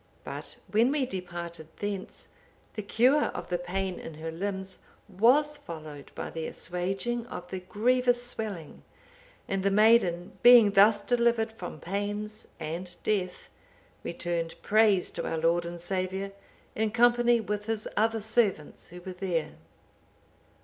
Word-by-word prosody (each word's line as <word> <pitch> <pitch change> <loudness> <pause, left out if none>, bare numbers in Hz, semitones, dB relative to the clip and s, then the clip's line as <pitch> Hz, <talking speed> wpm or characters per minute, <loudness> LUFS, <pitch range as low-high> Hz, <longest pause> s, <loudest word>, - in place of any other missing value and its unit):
But - - -7
when 230 +5 +4
we 285 -2 +1
departed 175 -5 -6
thence, 205 -2 -5 0.5
the 215 - -4
cure 250 +8 +3
of 175 -1 -5
the 175 -1 0
pain 185 +1 -3
in 165 - -8
her 160 +1 -5
limbs 190 +2 -4 0.3
was 255 +10 +3
followed 155 - -9
by - - -5
the 160 -1 -4
assuaging 195 +7 -2
of 180 -6 -7
the 190 - -3
grievous 245 +6 +1
swelling; 210 -10 -5 0.7
and 195 -1 -1
the 195 - +2
maiden 195 -4 +3
being 240 -4 +8
thus 205 +1 +6
delivered 235 -1 +2
from 175 -7 -8
pains 205 +4 -4
and 170 +3 -5
death, 185 -4 -1 0.6
returned 170 -1 -3
praise 210 -3 +3
to - - -4
our 165 - -2
Lord 170 +1 +1
and 170 0 -7
Saviour, 190 +2 -2 0.4
in 220 0 0
company 240 +1 +4
with 210 0 -3
His 220 -1 -1
other 225 +1 +1
servants 215 -8 0
who 180 +1 -11
were 185 +1 -7
there." 180 -3 -2
195 Hz, 140 wpm, -28 LUFS, 175-225 Hz, 0.7 s, being